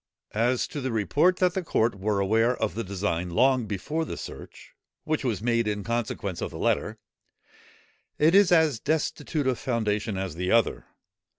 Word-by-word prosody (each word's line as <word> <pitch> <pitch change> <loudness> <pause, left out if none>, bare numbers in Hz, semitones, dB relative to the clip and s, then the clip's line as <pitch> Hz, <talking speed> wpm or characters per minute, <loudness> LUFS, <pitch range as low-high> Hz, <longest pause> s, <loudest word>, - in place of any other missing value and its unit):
As 120 +3 +1
to 145 - -5
the 130 -1 -2
report 145 - +2
that 180 -1 +2
the 190 - -1
court 115 -7 +1
were 100 +1 -1
aware 115 +5 +2
of 110 - -1
the 115 - -3
design 90 -2 -2
long 125 +5 +2
before 150 - -2
the - - -6
search, - - -10 0.3
which 155 -1 -1
was 110 -6 -2
made 115 -1 +1
in 105 -1 -2
consequence 110 -5 -3
of - - -2
the - - -9
letter, - - 0 1.2
it 155 +3 +4
is 200 -1 +6
as 160 -8 +4
destitute 150 0 -1
of 130 -2 0
foundation 110 -4 -1
as 95 -3 -3
the 90 +3 -3
other. 115 -1 +2
115 Hz, 175 wpm, -26 LUFS, 105-145 Hz, 1.2 s, is